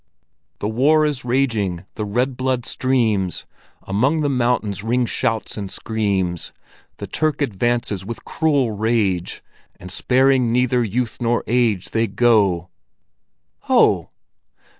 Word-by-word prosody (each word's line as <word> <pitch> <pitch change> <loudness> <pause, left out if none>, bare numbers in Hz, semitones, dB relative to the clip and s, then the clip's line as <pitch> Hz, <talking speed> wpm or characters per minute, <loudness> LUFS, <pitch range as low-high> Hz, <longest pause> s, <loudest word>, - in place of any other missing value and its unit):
"The 105 - -3
war 145 +8 +3
is 145 -4 -2
raging, 115 -8 0
the 105 - -4
red 125 +6 -1
blood 130 -1 -1
streams, 110 -10 0 0.4
Among 130 +11 +1
the 145 -1 +1
mountains 120 -5 0
ring 120 +2 +1
shouts 115 -2 -2
and 100 -2 -5
screams! 100 -6 -2 0.5
The - - -6
Turk 155 -2 -1
advances 120 -5 -1
with 115 +4 -7
cruel 145 -7 +1
rage, 105 -4 -1 0.4
And 90 0 -9
sparing 130 +2 +2
neither 125 0 +2
youth 115 +2 -2
nor 120 0 +1
age. 115 -5 +1
They 115 0 +1
go—" 100 -5 +2 0.9
"Ho!" - - +3
115 Hz, 120 wpm, -20 LUFS, 100-125 Hz, 0.9 s, war